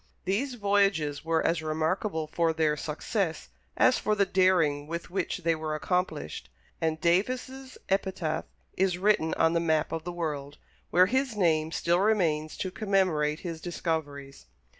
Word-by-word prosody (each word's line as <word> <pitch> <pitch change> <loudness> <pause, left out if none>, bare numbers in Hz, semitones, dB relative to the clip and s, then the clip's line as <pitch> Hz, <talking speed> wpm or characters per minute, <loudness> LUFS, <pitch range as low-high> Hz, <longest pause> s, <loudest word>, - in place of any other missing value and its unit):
These 240 +8 -1
voyages 195 -9 +1
were 165 0 +1
as 165 0 +1
remarkable 160 +2 -1
for 165 +1 0
their 155 -2 +1
success 160 +4 -3 0.3
as 255 - +4
for 215 - +1
the 200 -1 +3
daring 175 -7 +2
with 170 +2 -5
which 180 -1 -2
they 165 0 +3
were 155 -1 -3
accomplished, 160 - -2 0.3
and 160 -1 0
Davis' 255 +9 -1
epitaph 190 -5 -1 0.3
is 185 -1 +1
written 185 -4 +2
on 165 0 +3
the 170 - +2
map 160 -2 +1
of 165 -1 -3
the 175 - -4
world, 150 -4 -4 0.3
where 180 +1 +5
his 260 +2 0
name 160 -4 +2
still 170 +1 +1
remains 170 -7 +1
to 185 - -3
commemorate 180 -7 +1
his 165 -3 -6
discoveries. 150 -5 -4
170 Hz, 150 wpm, -28 LUFS, 155-195 Hz, 0.3 s, where